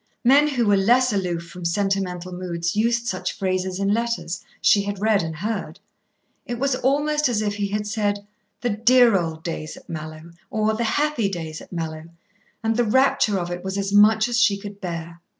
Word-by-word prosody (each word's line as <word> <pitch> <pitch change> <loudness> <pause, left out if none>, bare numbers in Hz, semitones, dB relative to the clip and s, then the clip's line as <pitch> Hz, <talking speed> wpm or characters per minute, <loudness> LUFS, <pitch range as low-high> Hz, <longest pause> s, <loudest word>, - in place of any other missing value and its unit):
Men 275 +5 +6
who 255 -5 0
were 205 -1 +4
less 240 +5 +3
aloof 175 -4 -2
from 175 +2 -10
sentimental 185 0 -1
moods 175 -1 -3
used 235 +2 +1
such 185 -4 -3
phrases 185 -1 -1
in 200 0 0
letters, 235 -6 -2 0.2
she 205 - +4
had 200 -1 -4
read 215 -1 +3
and 160 -1 -4
heard. 190 -2 -4 0.6
It 240 - -5
was 275 +2 +1
almost 290 +2 +1
as 215 -3 0
if 205 -1 -2
he 205 -1 -1
had 210 +1 -2
said 205 -1 -1 0.4
"the 245 - 0
dear 235 +1 +5
old 160 -3 -2
days 155 -2 -5
at - - -16
Mallowe" 155 +1 -8 0.2
or 220 -3 +1
"the 235 +2 -1
happy 290 -8 +1
days 160 -4 -6
at - - -14
Mallowe," 160 -2 -5 0.5
and 225 0 +1
the 240 - +3
rapture 235 -3 +3
of 175 -1 -3
it 175 0 -5
was 190 +1 -3
as 200 0 -2
much 215 +2 +5
as 240 -1 0
she 205 -5 +4
could 200 0 -10
bear. 170 -2 -6
200 Hz, 195 wpm, -23 LUFS, 175-230 Hz, 0.6 s, Men